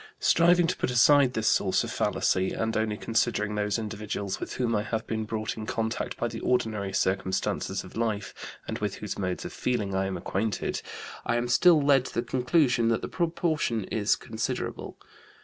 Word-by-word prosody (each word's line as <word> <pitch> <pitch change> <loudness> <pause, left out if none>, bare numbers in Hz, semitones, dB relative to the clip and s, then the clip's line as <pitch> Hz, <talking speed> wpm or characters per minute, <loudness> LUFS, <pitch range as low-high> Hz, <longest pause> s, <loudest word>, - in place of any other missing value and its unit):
Striving 175 +1 +4
to 180 - 0
put - - -1
aside 130 +2 +5
this 110 -2 -1
source 95 -2 +2
of - - -5
fallacy, 95 0 +1
and 110 0 -2
only 110 -1 0
considering 110 -2 0
those 105 0 0
individuals 105 -3 -4
with - - -5
whom 120 -3 0
I 105 - +1
have 110 +1 -3
been 110 -1 -2
brought 110 0 -3
in 110 -1 -7
contact 110 0 -2
by 120 - -1
the 115 -1 -6
ordinary 110 -5 0
circumstances 95 0 -1
of - - -13
life, 110 -3 -2 0.3
and - - -4
with - - -2
whose - - -5
modes 95 -2 -2
of - - -6
feeling 110 -6 -1
I 95 0 0
am 95 - -3
acquainted, 105 +2 -2 0.4
I - - 0
am 120 +1 0
still 160 +7 +5
led 140 -3 +4
to - - -8
the 115 - +1
conclusion 125 -1 +2
that 115 0 +1
the - - -2
proportion 165 - 0
is 105 -1 +2
considerable. 110 -1 -4
110 Hz, 185 wpm, -27 LUFS, 105-125 Hz, 0.4 s, aside